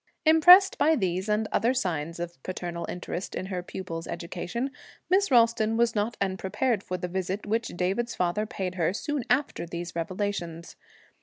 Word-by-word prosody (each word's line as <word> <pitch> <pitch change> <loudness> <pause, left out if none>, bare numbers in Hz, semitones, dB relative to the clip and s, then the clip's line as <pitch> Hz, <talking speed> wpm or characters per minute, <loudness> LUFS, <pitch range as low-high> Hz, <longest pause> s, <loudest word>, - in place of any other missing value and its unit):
Impressed 355 +5 +7
by 320 +1 +4
these 190 - -1
and 210 +1 +1
other 245 +3 +2
signs 170 - -2
of 170 -5 -6
paternal 175 -1 -5
interest 180 +1 -5
in - - -3
her 185 -2 -3
pupil's 170 -2 -6
education, 190 +9 -4 0.4
Miss 395 +2 +4
Ralston 230 -3 +3
was 235 -1 +3
not 215 +2 -1
unprepared 195 +4 0
for 185 -2 -4
the 180 0 -4
visit 190 +2 -3
which 225 +2 0
David's 195 +7 -1
father 180 +5 0
paid 190 -6 -4
her 165 +2 +2
soon 290 +4 -2
after 270 -3 +1
these 170 0 -6
revelations. 170 -1 -3
190 Hz, 160 wpm, -27 LUFS, 175-235 Hz, 0.4 s, Impressed